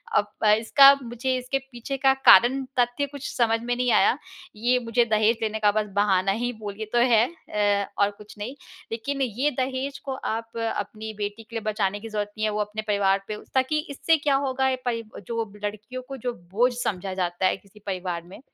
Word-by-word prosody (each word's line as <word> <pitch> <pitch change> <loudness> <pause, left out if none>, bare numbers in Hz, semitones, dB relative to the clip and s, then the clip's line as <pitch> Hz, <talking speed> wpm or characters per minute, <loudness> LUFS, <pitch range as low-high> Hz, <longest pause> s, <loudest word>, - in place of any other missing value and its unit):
अब 205 - +3 0.2
अ, 210 - +6
इसका 275 +6 +7
मुझे 245 +2 -2
इसके 255 +2 -1
पीछे 240 +3 -5
का 270 0 +4
कारण 265 +3 +7 0.2
तथ्य 245 +3 +1
कुछ 285 0 -7
समझ 225 -1 +2
में 245 +1 -1
नहीं 250 0 +1
आया, - - +4 0.4
ये 240 +4 +2
मुझे 235 0 +1
दहेज 220 +1 +2
लेने 220 -1 -1
का 210 -1 +4
बस 215 0 0
बहाना 195 -2 +3
ही 240 +4 -1
बोलिए 210 0 -5
तो - - +3
है 225 0 +6 0.2
अ, 205 -1 +1
और 200 0 +3
कुछ 210 0 -14
नहीं। 220 +6 -6 0.4
लेकिन 275 +5 -3
ये 260 +4 0
दहेज 265 +1 -2
को 270 - -2
आप 230 -2 -4
अपनी 220 -1 -3
बेटी 205 +2 -4
के 230 +1 -13
लिए 225 - -2
बचाने 205 -1 -1
की 225 +2 -8
ज़रूरत 210 -1 -3
नहीं 215 - 0
है, 215 - +1
वो 210 - -2
अपने 210 +1 -3
परिवार 200 -1 +2
पे 215 - -4 0.2
ताकि 265 +4 +2
इससे 320 +3 +2
क्या 285 -2 +1
होगा 265 0 +1
परी 230 -2 -1 0.2
जो 230 -1 -1 0.2
लड़कियों 215 +5 -5
को 270 - -6
जो 245 0 -3 0.2
बोझ 240 +6 +3
समझा 195 -5 -2
जाता 180 0 -1
है 185 - +2
किसी 200 +2 -20
परिवार 180 -3 -3
में, 180 +3 -13
225 Hz, 205 wpm, -25 LUFS, 205-255 Hz, 0.4 s, इसका